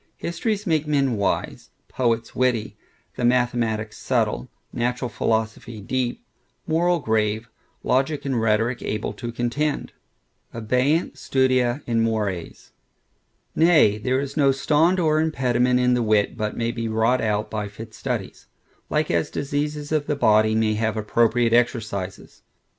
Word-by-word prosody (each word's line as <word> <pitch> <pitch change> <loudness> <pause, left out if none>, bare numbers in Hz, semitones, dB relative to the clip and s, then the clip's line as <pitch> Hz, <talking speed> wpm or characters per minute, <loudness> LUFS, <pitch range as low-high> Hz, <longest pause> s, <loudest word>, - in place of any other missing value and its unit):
Histories 210 +4 -2
make 160 -4 +1
men 140 -5 +1
wise; 100 -1 -2 0.2
poets 115 -2 -1
witty; 125 -4 0 0.4
the - - -3
mathematics 120 -3 0
subtile; - - -1 0.2
natural 125 +1 -1
philosophy 110 0 -2
deep; 125 +4 -3 0.4
moral 175 +2 +2
grave; 110 -4 0 0.4
logic 135 +4 0
and 130 -4 0
rhetoric 115 +3 +1
able 105 -1 -3
to 120 +2 -6
contend. 125 +5 -2 0.6
Abeunt 130 +7 0
studia 130 0 +1
in 115 -1 +1
mores. 105 -6 -3 0.8
Nay, 160 -11 +4
there 130 +4 0
is 140 0 -4
no 140 -3 +4
stond 155 +6 +2
or 155 -2 +2
impediment 125 -5 +1
in 125 0 +3
the 125 - +1
wit, 110 -1 +2
but 105 -2 -3
may 115 0 0
be 115 -1 -4
wrought 110 +3 +2
out 105 -1 -1
by 105 -1 -3
fit 110 +2 -10
studies; - - -5 0.4
like - - 0
as - - 0
diseases 145 +1 -3
of 155 -2 0
the 150 - 0
body, 110 -4 +3
may 110 -1 +2
have 110 0 -1
appropriate 115 +2 +2
exercises. 110 -6 -1
120 Hz, 135 wpm, -23 LUFS, 110-140 Hz, 0.8 s, Nay